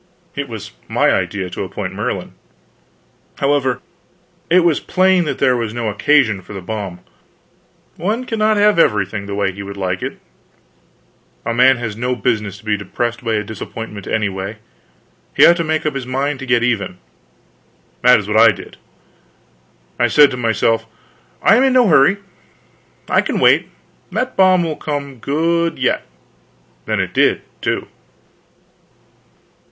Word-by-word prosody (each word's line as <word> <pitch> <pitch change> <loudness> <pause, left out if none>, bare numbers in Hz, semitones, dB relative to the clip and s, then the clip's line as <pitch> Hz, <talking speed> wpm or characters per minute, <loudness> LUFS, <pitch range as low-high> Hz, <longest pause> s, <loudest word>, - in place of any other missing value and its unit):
It 140 -2 -4
was 110 -3 -7 0.2
my - - +2
idea 95 -3 -2
to - - -4
appoint - - -5
Merlin. - - -4 1.0
However, 140 -3 0 0.7
it 180 +2 +5
was 170 -3 +2
plain 185 -1 +2
that 150 - -2
there 130 -2 +3
was 115 -2 -3
no 115 -2 -2
occasion 110 -2 +2
for 95 - -12
the 100 - -5
bomb. 95 -2 -5 1.0
One 215 +9 -2
cannot 215 -2 +1
have 205 -3 +4
everything 100 - +1
the 100 - -4
way 100 -1 0
he 100 +2 -9
would 100 0 -8
like 90 -1 -2
it. - - -5 1.3
A 115 - -1
man 130 +2 +5
has 115 -3 -4
no 125 +3 -1
business 105 -6 -1
to 105 - -18
be 105 -1 +1
depressed 115 +4 -3
by 115 -2 0
a 105 - -1
disappointment, 110 -1 -8
anyway; 100 -1 -2 0.8
he - - +7
ought 175 - +6
to 170 - 0
make 155 0 -1
up 155 - 0
his 135 -2 -5
mind 135 +2 -2
to 135 - -7
get 120 -2 +2
even. 105 -7 -1 1.0
That 125 0 +6
is 105 -2 -5
what 105 +1 0
I - - +8
did. - - -11 1.2
I 120 - +4
said 145 +4 +5
to - - -3
myself, 115 -1 0 0.6
I 225 - +6
am 255 - +4
in 265 -1 +3
no 250 -3 +5
hurry, 155 +3 +5 0.9
I - - +3
can - - -3
wait; - - +4 0.4
that 255 0 -2
bomb 185 -2 +4
will 160 -2 -3
come 140 -4 -5
good 165 +5 0
yet. 130 - 0 0.8
And - - 0
it - - -2
did, - - +2 0.2
too. - - -2
125 Hz, 160 wpm, -18 LUFS, 105-155 Hz, 1.3 s, I